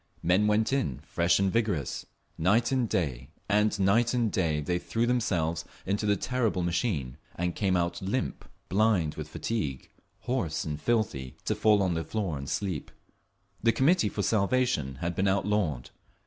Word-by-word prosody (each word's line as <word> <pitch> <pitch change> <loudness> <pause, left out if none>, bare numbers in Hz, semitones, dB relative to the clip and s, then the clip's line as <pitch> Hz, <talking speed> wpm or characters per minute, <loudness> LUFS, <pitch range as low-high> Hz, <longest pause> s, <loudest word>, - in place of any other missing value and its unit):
Men 95 +5 +3
went 110 +4 +2
in, 70 - 0
fresh 85 +1 +2
and 100 -1 +1
vigorous; 105 -11 -1 0.3
night 105 +10 +2
and 130 -4 +1
day 65 -6 -2 0.2
and 105 +1 +2
night 115 +6 +3
and 115 -4 +1
day 80 -5 +1
they 90 +4 -1
threw 115 +5 -1
themselves 85 -10 0 0.2
into 100 +2 -1
the 100 - +4
terrible 115 -4 0
machine; 85 - -1 0.2
and 90 0 -1
came 95 -3 +1
out 85 0 -1
limp, 105 +8 -2 0.2
blind 95 -6 +2
with 75 -1 -7
fatigue, 80 - -3 0.3
hoarse 110 -10 -1
and 75 -1 -4
filthy, 100 - -1
to - - +1
fall 105 -2 +3
on 90 -2 +1
the 80 0 -1
floor 100 -6 -2
and 70 -1 -6
sleep…. 95 -8 -2 0.7
The 115 - +4
Committee 150 - +3
for 100 - -3
Salvation 100 - +1
had 85 +1 -1
been 95 +3 +1
outlawed. 95 -8 0
95 Hz, 160 wpm, -28 LUFS, 80-110 Hz, 0.7 s, the